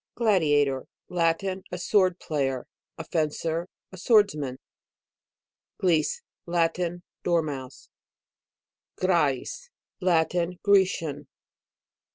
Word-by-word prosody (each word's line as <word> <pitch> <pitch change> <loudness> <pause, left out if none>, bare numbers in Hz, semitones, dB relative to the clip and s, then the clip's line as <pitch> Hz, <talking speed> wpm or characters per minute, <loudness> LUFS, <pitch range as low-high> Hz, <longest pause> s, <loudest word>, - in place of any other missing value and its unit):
GLADIATOR. 145 - +2 0.2
Latin. 180 +2 0
A 180 - -3
sword 185 0 +2
player, 135 -6 -2 0.3
a 160 - -5
fencer, 165 +2 -1 0.2
a 185 - -10
swords 205 +2 +4
rnan. 135 -4 -4 1.2
GLIS. 180 - +1 0.2
Latin. 175 +1 0 0.2
Dormouse. 150 -7 -2 1.1
GRMUS. 175 - 0 0.3
Latin. 175 0 +1
Grecian. 170 -8 +2
170 Hz, 80 wpm, -26 LUFS, 150-185 Hz, 1.2 s, swords